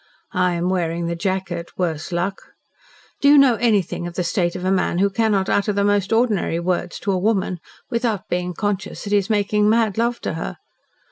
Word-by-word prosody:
I 180 -2 +2
am 170 +1 -1
wearing 170 -2 -1
the 170 0 -2
jacket 185 -1 -3
worse 165 -2 -2
luck! 180 +3 -3 0.7
Do 280 - +4
you 290 +1 +8
know 275 -3 +6
anything 205 -6 +1
of 175 - -8
the 180 - -1
state 175 0 0
of 180 0 -4
a 185 - +2
man 185 -2 +1
who 200 +2 +2
cannot 200 -2 +1
utter 205 +1 +1
the 200 0 +1
most 205 -1 +1
ordinary 225 -7 +1
words 175 0 -2
to 200 - 0
a 185 - +1
woman 190 -3 0 0.3
without 230 -4 -1
being 180 0 -2
conscious 205 -1 -3
that 205 - -6
he 205 - +5
is 195 - -5
making 210 0 +2
mad 220 -2 +2
love 235 +1 0
to - - -3
her? - - -5
190 Hz, 205 wpm, -21 LUFS, 175-210 Hz, 0.7 s, you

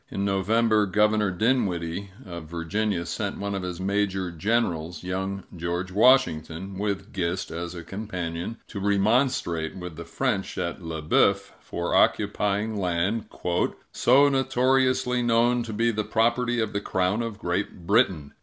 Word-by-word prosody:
In 100 - -2
November, 105 +2 +2
Governor 105 +1 +2
Dinwiddie, 95 -3 0 0.2
of 85 -3 -7
Virginia, 85 +2 -1
sent 85 - -3
one 100 0 -3
of 100 - -2
his 90 -1 -5
major 95 -1 0
generals, 85 -3 -1
young 95 +1 -3
George 85 +2 -3
Washington, 95 -5 +2
with 100 -1 -3
Gist 90 0 -2
as 85 +2 -5
a 85 - -7
companion, 90 0 -5
to 100 - -5
remonstrate 100 - +1
with 90 -4 -7
the 85 - -6
French 105 +2 -2
at 90 0 -3
Le 80 -2 -5
Boeuf 75 - +2
for 85 0 -4
occupying 105 +2 +2
land 95 +4 0 0.6
"so 135 +4 +5
notoriously 130 -1 +2
known 120 +1 +3
to 115 -1 -5
be 115 +2 +1
the 110 -1 -1
property 120 +3 +1
of 110 -2 -1
the 100 - -1
Crown 95 +3 0
of 115 -3 -4
Great 90 -1 -3
Britain." 95 - +2
100 Hz, 145 wpm, -26 LUFS, 85-115 Hz, 0.6 s, so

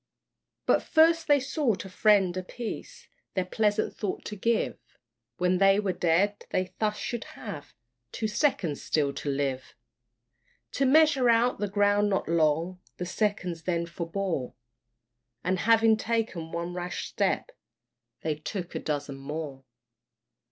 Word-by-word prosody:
But - - +4
first 330 0 +4
they 290 -1 +5
sought 260 - -1
a - - -8
friend 195 -2 +3
apiece, 215 +5 -6 0.3
This 185 -2 +1
pleasant 215 -1 +1
thought 205 -3 -4
to 210 - -5
give 230 +3 0 0.6
When 180 0 +2
they 195 +1 +5
were 200 -3 0
dead, 180 +5 +1
they 185 0 -1
thus 210 -1 0
should 240 +1 -3
have 150 -10 -8 0.4
Two 220 - -2
seconds 210 - 0
still 145 -3 0
to 145 - -4
live. 135 -2 -2 1.0
To 275 - +1
measure 285 -3 +5
out 235 0 +3
the 205 - 0
ground 205 +1 +3
not 195 - 0
long 165 +2 +1 0.2
The 180 - -3
seconds 185 -3 -1
then 170 -1 -1
forbore, 170 -4 -3 0.9
And 185 +1 0
having 225 -1 +6
taken 220 -8 -2
one 170 +1 -3
rash 175 -1 -4
step, - - -1 0.7
They 160 - 0
took 175 +4 -6
a - - -2
dozen 145 -2 -3
more. 140 -1 -6
190 Hz, 135 wpm, -28 LUFS, 165-220 Hz, 1.0 s, having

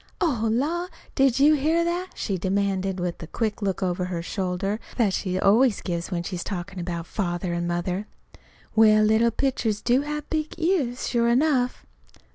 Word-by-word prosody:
"Oh, 250 - +1
la! 320 +9 0 0.3
Did 270 -3 +3
you 295 +2 +6
hear 315 +4 +2
that?" 350 +2 -2
she 200 - -2
demanded, 190 0 -1
with 175 -1 -3
the 165 - -8
quick 220 +3 -2
look 195 -2 -1
over 180 0 -1
her 175 -2 -4
shoulder 195 +3 -2 0.2
that 215 -6 +2
she 185 -1 -1
always 215 +4 +4
gives 170 -2 -3
when 175 -2 -2
she's 175 -1 -4
talking 190 0 -5
about 170 -1 -4
Father 175 -2 -2
and 170 0 -2
Mother. 180 +4 -2 0.7
"Well, 215 -1 +6
little 220 +2 +4
pitchers 230 -4 -1
do 245 +4 +2
have 300 0 -4
big 310 -1 -2
ears, 320 -8 0
sure 235 -1 +2
enough!" 250 0 +2
215 Hz, 170 wpm, -25 LUFS, 185-265 Hz, 0.7 s, you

